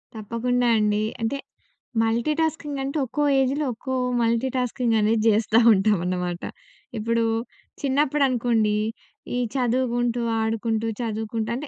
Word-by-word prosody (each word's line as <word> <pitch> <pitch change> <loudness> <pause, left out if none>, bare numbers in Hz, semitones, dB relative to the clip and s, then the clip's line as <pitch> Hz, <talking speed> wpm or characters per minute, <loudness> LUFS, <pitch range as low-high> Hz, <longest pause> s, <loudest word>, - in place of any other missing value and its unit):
తప్పకుండా 240 +3 -1
అండి. 210 0 +1 0.2
అంటే 225 +5 -1 0.6
మల్టీటాస్కింగ్ 295 +6 0
అంటే 275 +3 -3
ఒక్కో 295 +4 -2 0.2
ఏజ్‌లో, 275 +3 +1
ఒక్కో 260 +3 -5 0.3
మల్టీటాస్కింగ్ 240 0 0
అనేది 215 +2 +2
జేస్తా 220 +1 +3
ఉంటాం 205 0 +3
అనమాట. 180 -1 -2 0.6
ఇప్పుడు 230 +1 0 0.6
చిన్నప్పుడు 285 +1 +1
అనుకోండి, 230 -4 +1 0.6
ఈ - - 0 0.2
చదువుగుంటూ, 245 -1 0 0.2
ఆడుకుంటూ 225 0 -1
చదువుకుంటూ 220 -1 -3
అంటే, 290 +4 -5
230 Hz, 110 wpm, -24 LUFS, 220-260 Hz, 0.6 s, జేస్తా